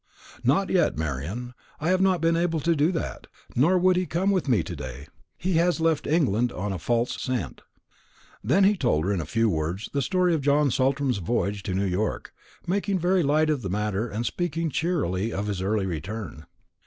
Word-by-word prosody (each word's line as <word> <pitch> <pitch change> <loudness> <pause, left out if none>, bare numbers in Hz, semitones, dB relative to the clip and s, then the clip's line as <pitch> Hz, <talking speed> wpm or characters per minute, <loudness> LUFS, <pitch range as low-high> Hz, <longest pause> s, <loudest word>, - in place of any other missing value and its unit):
"Not 160 +11 +2
yet, 175 - +2
Marian; 80 - -4 0.3
I 155 - -1
have 185 0 +3
not 190 -3 +3
been 165 0 +3
able 165 -1 +1
to 170 +3 +2
do 150 +4 +2
that. 165 - -4 0.3
Nor 170 +9 +4
could 185 0 +4
he 180 -1 0
come 190 +4 +1
with 185 -7 0
me 110 -9 +3
to 85 - -6
day. 70 0 -8 0.3
He 180 -2 0
has 170 +1 +2
left 160 -2 +1
England 125 - +2
on 100 0 -3
a 95 - -4
false 120 +8 -1
scent." 125 -8 -3 0.8
And 105 - -8
then 190 +8 +5
he 205 +2 +5
told 120 - +1
her, 100 - +1
in 90 - -1
a 75 - -7
few 115 +6 +1
words, 85 +3 -2
the 140 - +1
story 180 +3 +2
of 160 - 0
John 145 0 +3
Saltram's 135 -2 +1
voyage 100 +1 -1
to 95 -2 -3
New 100 +1 +1
York; 95 +3 -2 0.3
making 200 +2 0
very 180 +1 +2
light 155 +1 +2
of 145 -4 -1
the 95 - -4
matter, 105 +3 -1
and 110 +3 -3
speaking 165 +1 -2
cheerily 115 - -1
of 100 -1 -3
his 100 -3 -3
early 100 +1 0
return. 90 0 -5
130 Hz, 205 wpm, -25 LUFS, -, 0.8 s, then